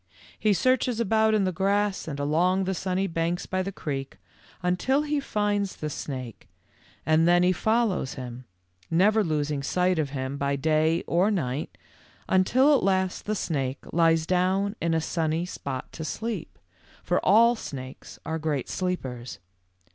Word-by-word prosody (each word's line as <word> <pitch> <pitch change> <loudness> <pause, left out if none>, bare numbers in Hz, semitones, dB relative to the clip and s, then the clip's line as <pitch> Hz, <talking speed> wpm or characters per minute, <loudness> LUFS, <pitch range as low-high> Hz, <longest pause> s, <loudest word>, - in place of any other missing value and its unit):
"He 215 - +3
searches 250 +4 +2
about 220 0 +3
in 210 - +2
the 185 - +1
grass 200 +2 0
and 145 -3 -5
along 175 +6 +2
the 190 +1 -1
sunny 185 +1 -1
banks 170 0 -1
by 185 0 -1
the 195 +1 -3
creek 135 -6 -5 0.5
until 260 +11 +1
he 300 -1 0
finds 205 -6 -1
the 155 -1 -4
snake 130 -6 -6 0.6
and 160 +2 +4
then 175 0 +5
he 180 - +4
follows 220 - 0
him, 125 -1 -8 0.4
never 210 +6 +4
losing 150 -4 -1
sight 180 +4 +1
of 150 -3 0
him 135 0 -4
by 140 0 0
day 155 +3 +1
or 180 +5 +2
night, 145 -8 -2 0.5
until 255 +10 +4
at - - +2
last 190 -1 0
the 215 - 0
snake 135 -8 -2
lies 165 -1 +3
down 190 +3 +1
in 165 0 +1
a 160 - +1
sunny 160 +1 -1
spot 135 -7 -6
to 160 - -7
sleep, 215 +3 -4 0.5
for 180 - 0
all 230 +4 +5
snakes 130 - -8
are 160 0 -2
great 150 -4 -2
sleepers. 130 - -4
180 Hz, 155 wpm, -26 LUFS, 150-200 Hz, 0.6 s, then